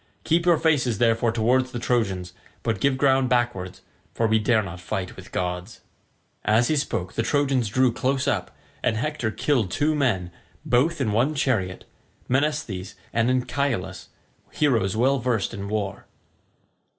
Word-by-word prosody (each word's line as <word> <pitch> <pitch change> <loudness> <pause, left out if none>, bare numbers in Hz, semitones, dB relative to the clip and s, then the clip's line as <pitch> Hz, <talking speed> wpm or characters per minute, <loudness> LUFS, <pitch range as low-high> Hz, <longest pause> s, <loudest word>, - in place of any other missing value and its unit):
Keep 170 +2 +1
your 170 -2 +6
faces 135 -9 +2
therefore 115 0 +2
towards 125 +3 +1
the 120 - -4
Trojans, 100 -8 -1 0.3
but 115 -4 -1
give 140 -2 +2
ground 135 -2 +3
backwards, 120 -7 -1 0.3
for 115 - +1
we 110 0 +3
dare 110 0 +2
not 90 -2 -7
fight 95 0 -4
with - - -12
gods." 90 +3 -4 0.6
As 110 +3 +3
he 155 - +2
spoke 110 -11 -2
the - - 0
Trojans 135 -3 +1
drew 130 +2 +2
close 130 +2 0
up, - - 0 0.3
and 110 - +1
Hector 130 -2 -1
killed 115 -3 0
two 150 +10 +1
men, 110 -12 0 0.3
both 140 +6 +2
in 110 - +1
one 125 +9 +1
chariot, 110 -10 -1 0.4
Menesthes 130 -9 -1 0.2
and 115 +1 +2
Anchialus, 130 -3 -1 0.4
heroes 110 -9 +1
well 135 +4 +3
versed 120 -4 -1
in 100 -2 -5
war. 105 -3 -3
120 Hz, 150 wpm, -24 LUFS, 105-135 Hz, 0.6 s, your